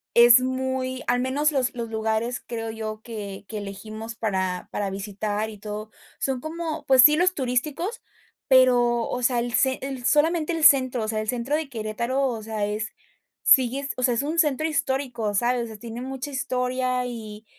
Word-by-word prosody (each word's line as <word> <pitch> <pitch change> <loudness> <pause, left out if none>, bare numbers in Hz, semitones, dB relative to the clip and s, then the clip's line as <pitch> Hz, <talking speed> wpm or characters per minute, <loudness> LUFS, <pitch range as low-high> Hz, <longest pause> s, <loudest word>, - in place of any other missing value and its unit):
es 235 +1 +8
muy 260 0 -2
al 245 +1 +1
menos 275 +4 +1
los 260 -4 0
los 230 -2 -5
lugares, 220 +2 -1
creo 225 -1 -5
yo, 215 -1 -6
que 205 -4 -7
que 215 - -5
elegimos 215 +3 -7
para 190 -5 -2
para 200 -1 -2
visitar 205 +2 -3
y 210 - -12
todo, 210 +1 -6 0.3
son 265 -2 -1
como 315 -1 -5
pues 260 -2 +7
sí, 300 +2 +7
los 365 +2 +2
turísticos, 290 - -2 0.5
pero, 245 -2 +5
o 250 - -3
sea, 245 0 +2
el 240 0 -3
cen 265 0 +2
el 265 -2 -5
solamente 320 +3 +2
el 325 -1 -2
centro, 255 -5 +5
o - - -3
sea, 215 -1 -1
el 215 - -6
centro 245 +4 -1
de 315 -3 -4
Querétaro, 235 +3 -2
o 230 -3 -4
sea, 215 -1 -3
es 210 +1 -3 0.5
sigues 270 +2 +4
o - - -3
sea, 245 -1 +3
es 240 - 0
un 315 +3 -1
centro 310 -1 +2
histórico, 265 -8 -1
¿sabes?, 240 +3 +1
o - - -8
sea, 220 -1 -9
tiene 235 +2 -7
mucha 265 +2 -5
historia, 255 -1 -1
y 220 -3 -7
245 Hz, 190 wpm, -24 LUFS, 220-265 Hz, 0.5 s, es